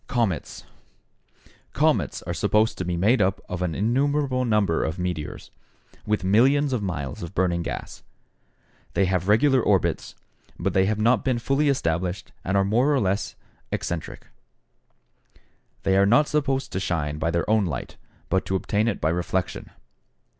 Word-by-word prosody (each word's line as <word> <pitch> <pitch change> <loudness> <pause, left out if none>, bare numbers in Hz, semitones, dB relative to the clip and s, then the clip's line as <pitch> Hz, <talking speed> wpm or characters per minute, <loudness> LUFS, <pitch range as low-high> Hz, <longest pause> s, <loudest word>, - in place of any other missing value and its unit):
=Comets.= 110 -10 -2 1.1
Comets - - +1
are - - -4
supposed 110 +2 +2
to - - -1
be 90 -1 -2
made 105 +7 +3
up 95 0 +1
of 90 0 -5
an 85 -3 -1
innumerable 130 +3 +1
number 105 -7 +1
of 80 +3 -3
meteors, 90 -4 -4 0.6
with 105 -1 0
millions 130 +8 +3
of 120 - 0
miles 70 -9 -4
of 85 +2 -7
burning 90 -2 +1
gas. - - -6 0.9
They 100 - +3
have 90 -1 -1
regular 130 +5 +4
orbits, 100 -5 0 0.4
but 90 +1 -1
they 95 0 +3
have 110 0 0
not 115 +1 +3
been 130 -2 +1
fully 135 +5 +1
established 90 -6 -1
and 95 +2 0
are 95 - +3
more 120 +8 +2
or 140 - +3
less 100 0 -1 0.4
eccentric. 85 -2 -4 1.6
They 95 - +2
are 100 +1 +4
not 140 +8 +4
supposed 135 -3 -1
to 95 - -2
shine 75 -5 -2
by 80 - 0
their 85 0 -1
own 110 -2 +3
light, 70 -7 -5 0.3
but 95 +1 +1
to 95 - 0
obtain 105 +3 0
it 110 - -1
by 80 - +2
reflection. 90 +2 -2
100 Hz, 160 wpm, -24 LUFS, 90-120 Hz, 1.6 s, regular